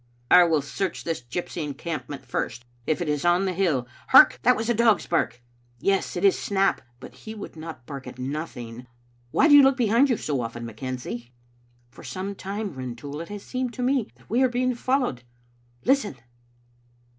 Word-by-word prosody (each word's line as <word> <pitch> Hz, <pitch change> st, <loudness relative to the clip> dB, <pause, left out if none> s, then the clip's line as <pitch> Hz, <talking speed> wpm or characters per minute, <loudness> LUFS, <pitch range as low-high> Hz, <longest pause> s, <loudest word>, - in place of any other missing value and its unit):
" -, -, -37 dB
I 180 Hz, -1 st, +9 dB
will 160 Hz, -4 st, +2 dB
search 175 Hz, +5 st, -3 dB
this 165 Hz, -5 st, -2 dB
gypsy 155 Hz, +7 st, -4 dB
encampment 150 Hz, 0 st, -5 dB
first, 120 Hz, +2 st, -3 dB, 0.2 s
if 160 Hz, +3 st, +1 dB
it -, -, -6 dB
is 150 Hz, -1 st, -1 dB
on 175 Hz, +2 st, +3 dB
the 185 Hz, -, -1 dB
hill. 165 Hz, -10 st, +1 dB, 0.2 s
Hark! 125 Hz, 0 st, +8 dB
that -, -, +5 dB
was 225 Hz, +1 st, -3 dB
a 240 Hz, -, +3 dB
dog's 225 Hz, -2 st, +3 dB
bark. 125 Hz, -7 st, -1 dB, 0.4 s
Yes, 195 Hz, +3 st, 0 dB
it 180 Hz, -, +1 dB
is 195 Hz, -, +4 dB
Snap; 195 Hz, -1 st, +1 dB, 0.2 s
but -, -, -11 dB
he 220 Hz, 0 st, -9 dB
would 205 Hz, -, -8 dB
not 160 Hz, -6 st, -9 dB
bark 135 Hz, -2 st, -8 dB
at 125 Hz, -, -9 dB
nothing. 125 Hz, -3 st, -6 dB, 0.4 s
Why 315 Hz, -, +4 dB
do 300 Hz, -, +6 dB
you 290 Hz, -, +10 dB
look 270 Hz, -1 st, +4 dB
behind 240 Hz, +3 st, +4 dB
you 245 Hz, -, +2 dB
so 140 Hz, -4 st, -2 dB
often, 115 Hz, 0 st, -5 dB
McKenzie?" 120 Hz, +1 st, -6 dB, 0.3 s
" 120 Hz, 0 st, -36 dB
For -, -, -14 dB
some 195 Hz, +1 st, -4 dB
time, 200 Hz, +1 st, -5 dB
Rintoul, 130 Hz, +3 st, -6 dB
it 170 Hz, -, -8 dB
has 205 Hz, -1 st, -7 dB
seemed 255 Hz, -2 st, -3 dB
to 250 Hz, -, -3 dB
me 255 Hz, -3 st, +1 dB
that -, -, -24 dB
we 240 Hz, +4 st, +1 dB
are 260 Hz, -, +4 dB
being 250 Hz, +1 st, 0 dB
followed. 250 Hz, -, 0 dB, 0.6 s
Listen!" 260 Hz, -, +2 dB
170 Hz, 195 wpm, -25 LUFS, -, 0.6 s, you